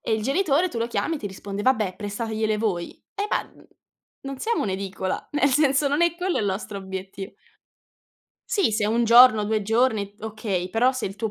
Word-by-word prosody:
E -, -, -3 dB
il 220 Hz, -, -2 dB
genitore 310 Hz, -, +2 dB
tu 240 Hz, -, -5 dB
lo 230 Hz, -, 0 dB
chiami 230 Hz, +8 st, -1 dB
e -, -, -7 dB
ti 210 Hz, -, -5 dB
risponde: 200 Hz, +1 st, -6 dB
"Vabbè, 215 Hz, -6 st, +1 dB
prestategliele 215 Hz, +1 st, -2 dB
voi." 190 Hz, -6 st, -2 dB, 0.2 s
Eh, 405 Hz, -, -2 dB
ma -, -, 0 dB, 0.8 s
non 275 Hz, -1 st, -6 dB
siamo 465 Hz, -, 0 dB
un'edicola, 190 Hz, -1 st, -3 dB
nel 290 Hz, -1 st, +3 dB
senso 280 Hz, +1 st, +3 dB
non 290 Hz, +4 st, +1 dB
è 340 Hz, -1 st, +3 dB
quello 365 Hz, +1 st, -1 dB
il -, -, 0 dB
nostro 200 Hz, +1 st, -3 dB
obietti 190 Hz, +1 st, -7 dB, 1.2 s
Sì, 395 Hz, -, +2 dB
se 210 Hz, -1 st, +1 dB
1 230 Hz, +3 st, +2 dB
giorno, 235 Hz, -1 st, +7 dB
2 215 Hz, 0 st, 0 dB
giorni, 220 Hz, -2 st, +1 dB
okay, 210 Hz, -4 st, -3 dB
però 240 Hz, +6 st, +2 dB
se 260 Hz, -2 st, -3 dB
il 195 Hz, +1 st, -7 dB
tuo 220 Hz, 0 st, -2 dB
220 Hz, 190 wpm, -24 LUFS, 200-265 Hz, 1.2 s, giorno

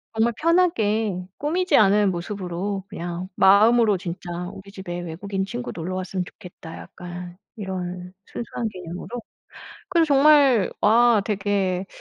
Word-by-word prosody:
정말 230 Hz, +2 st, +2 dB
편하게 225 Hz, -, +2 dB, 0.2 s
꾸미지 360 Hz, +6 st, +1 dB
않은 205 Hz, -1 st, +4 dB
모습으로 185 Hz, +2 st, -4 dB
그냥 175 Hz, +2 st, -5 dB
마음으로 215 Hz, +2 st, +5 dB
진짜 175 Hz, 0 st, -7 dB, 0.2 s
'우리 195 Hz, 0 st, -12 dB
집에 185 Hz, -3 st, -6 dB
외국인 190 Hz, +3 st, -4 dB
친구 245 Hz, +5 st, -5 dB
놀러 180 Hz, +2 st, -4 dB
왔으면 185 Hz, 0 st, -3 dB
좋겠다.' 170 Hz, -2 st, -11 dB
약간 175 Hz, 0 st, -9 dB, 0.2 s
이런 180 Hz, -3 st, -5 dB
순수한 235 Hz, -1 st, -5 dB
개념으로. 180 Hz, -2 st, -8 dB, 0.8 s
그래서 335 Hz, -3 st, +3 dB
정말 280 Hz, -6 st, +5 dB
와 230 Hz, 0 st, +5 dB
되게 195 Hz, -2 st, -1 dB
195 Hz, 290 characters per minute, -23 LUFS, 180-230 Hz, 0.8 s, 마음으로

